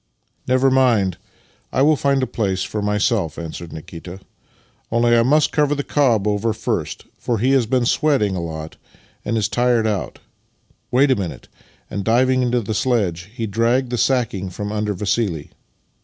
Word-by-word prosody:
" - - -46
Never 130 +1 +3
mind; 115 -9 +2 0.5
I 130 - +2
will 155 +2 +5
f:nd 140 -2 +1
a - - +2
place 95 -6 -1
for 105 - -4
myself/' 105 - 0
answered 85 0 -7
Nikita. 85 +3 -9 0.4
" - - -37
Only, 120 +1 +3
I 115 - +5
must 145 +6 +3
cover 150 -1 +2
the 145 - -2
cob 120 -10 +2
over 105 +2 0
first, - - -3
for 120 - -1
he 125 +6 +2
has 130 -4 +3
been 125 0 +1
sweating 130 - +2
a 90 - -2
lot 80 -1 -6 0.5
and 115 - -1
is 105 - +1
tired 120 -2 +2
out. 95 - -2 0.7
Wait 135 +3 +3
a - - +4
minute" 95 -5 -6 0.2
— - - -34
and. 100 - -3
diving 130 +4 +3
into 125 -1 +1
the 110 +1 -3
sledge, 100 -8 0
he 115 - -2
dragged 115 +4 +1
the 120 - -1
sacking 110 -8 0
from 105 +3 -5
under 105 -1 -1
Vassili. 95 -5 -1
115 Hz, 180 wpm, -20 LUFS, 100-130 Hz, 0.7 s, will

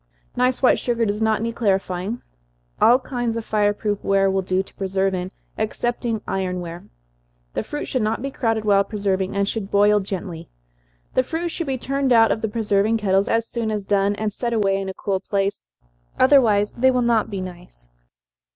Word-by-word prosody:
Nice 250 +1 +1
white 255 - +5
sugar 235 -2 0
does 210 +1 -2
not 220 0 +1
need 230 0 -2
clarifying. 195 0 -1 0.6
All 240 +2 +7
kinds 245 -3 -3
of 225 - -5
fire 210 -1 +2
proof 205 -1 -3
ware 195 0 +3
will 190 0 +1
do 185 0 0
to - - -17
preserve 195 0 -1
in, 180 0 -3 0.3
excepting 230 0 -2
iron 185 -1 -2
ware. 170 0 -7 0.7
The - - -1
fruit 295 - -5
should 255 - -1
not 215 +1 0
be 275 +2 -4
crowded 225 -4 -1
while 200 -1 +4
preserving, 195 -3 -2
and 200 0 +1
should 210 -2 -3
boil 205 +1 +4
gently. 185 -4 -6 0.6
The - - +4
fruit 330 +6 -3
should 335 -1 -4
be 265 -1 -1
turned 275 +1 -1
out 225 -2 +6
of 220 - -1
the 220 - 0
preserving 215 0 +1
kettles 195 -2 +1
as 230 0 +1
soon 230 -2 -3
as 210 -2 -3
done, 200 0 +2
and 210 0 -2
set 235 +2 -2
away 195 -3 +1
in 195 - -4
a 190 - -6
cool 195 -2 -1
place, 195 0 -1 0.6
otherwise 230 -7 +4
they 260 +2 +3
will 250 -1 +2
not 230 -2 +2
be 200 -3 -4
nice. 115 - -10
210 Hz, 195 wpm, -22 LUFS, 195-235 Hz, 0.7 s, All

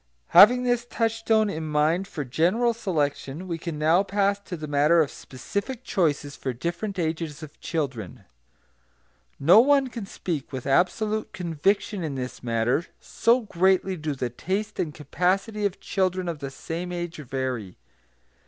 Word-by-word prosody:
Having 235 +8 +8
this 245 -1 +1
touchstone 225 -1 +1
in 160 -5 -3
mind 155 +5 +1
for 150 - -5
general 180 - +2
selection, 160 -5 -2
we 170 -2 -3
can 165 -2 -5
now 160 +4 +4
pass 200 0 +1
to 190 -3 -7
the 155 - -6
matter 150 +3 +4
of 155 -4 +2
specific 200 - -5
choices 145 -8 0
for 130 - -3
different 175 - -4
ages 160 -2 -3
of 150 -1 -11
children. 130 - -4 1.2
No 170 +9 +7
one 275 +1 +4
can 230 -5 -7
speak 165 -8 -4
with 130 -2 -5
absolute 210 +9 +1
conviction 185 +3 0
in 150 -4 -3
this 125 -1 -5
matter, 120 +7 0
so 240 +2 +2
greatly 190 -2 +2
do 155 -3 -3
the 125 -2 -3
taste 200 - -3
and 155 - -1
capacity 190 - -1
of 195 - -10
children 185 -2 -1
of 165 -3 -3
the 140 -1 -5
same 165 +6 -5
age 175 -1 -4
vary. 130 -8 -4
170 Hz, 155 wpm, -25 LUFS, 145-200 Hz, 1.2 s, Having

